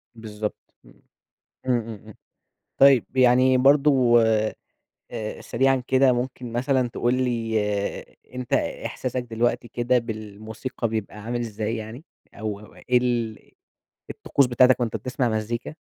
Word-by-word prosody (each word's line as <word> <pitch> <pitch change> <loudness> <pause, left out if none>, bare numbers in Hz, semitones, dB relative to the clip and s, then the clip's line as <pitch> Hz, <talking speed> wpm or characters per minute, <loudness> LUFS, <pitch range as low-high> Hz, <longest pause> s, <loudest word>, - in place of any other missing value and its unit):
بالضبط. 105 -1 -7
إمم. - - -20 0.7
إمم، 125 -2 +2
إمم، 115 0 -7
إمم، 110 - -13 0.6
طيب، 135 -3 +6
يعني 130 +1 +5
برضه 135 -4 +5
آآ، 110 -1 -1 0.7
سريعًا 135 +3 +1
كده، 130 0 +4
ممكن 125 -1 -4
مثلًا 130 0 +1
تقول 120 +1 0
لي 115 -3 0 0.8
أنت 125 -1 -6
إحساسك 125 - -2
دلوقتي 120 0 -1
كده 120 +2 +1
بالموسيقى، 110 +1 -5
بيبقى 110 -1 -4
عامل 120 +2 -3
ازاي 110 0 -3
يعني؟ 110 +7 -8 0.3
أو 105 -1 -5
أو 105 - -15
إيه 125 0 +1
ال 120 -3 -1 0.7
الطقوس 140 - +1
بتاعتك 125 +1 +4
وأنت 115 -2 -1
بتسمع 125 +2 -1
مزّيكا؟ 110 +5 -3
120 Hz, 125 wpm, -24 LUFS, 110-125 Hz, 0.8 s, طيب